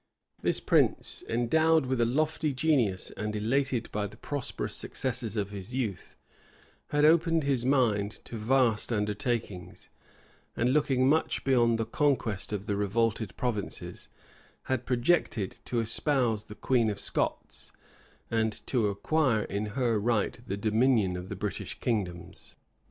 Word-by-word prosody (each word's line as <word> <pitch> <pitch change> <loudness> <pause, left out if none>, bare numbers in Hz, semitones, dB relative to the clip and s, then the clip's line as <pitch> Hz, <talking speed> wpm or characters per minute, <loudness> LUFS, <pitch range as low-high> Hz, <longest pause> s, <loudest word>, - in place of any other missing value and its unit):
This - - +1
prince, - - +2
endowed 155 +6 +3
with 130 -1 0
a 115 - +3
lofty 155 +2 0
genius, 130 -10 +1
and 105 0 -4
elated 120 +3 0
by 105 0 -1
the 105 +2 -14
prosperous 140 +1 -4
successes 120 -4 -3
of 100 -1 -2
his 100 +4 -7
youth, 110 -9 -3 0.7
had 145 0 +2
opened 165 0 +4
his 135 -4 +1
mind 110 -6 +1
to - - -8
vast 115 0 +2
undertakings; 105 - -3 0.7
and 125 +2 +2
looking 135 -3 +2
much 160 +3 +1
beyond 120 -4 +3
the 115 - -1
conquest 120 - 0
of 105 -1 -3
the 100 - -1
revolted 105 0 0
provinces, 115 -6 -4 0.5
had 130 -2 -2
projected 120 - +1
to 120 - -1
espouse 115 -1 0
the 105 - -10
queen 115 0 +2
of 100 -1 -4
Scots, - - -3 0.6
and 110 -1 +1
to 120 -5 +1
acquire 115 +3 +1
in 100 +2 -3
her 120 -4 +2
right 115 +1 0
the 100 - -2
dominion 110 -2 +2
of 90 +1 -6
the - - -4
British - - -4
kingdoms. 90 -7 -3
115 Hz, 140 wpm, -29 LUFS, 105-130 Hz, 0.7 s, opened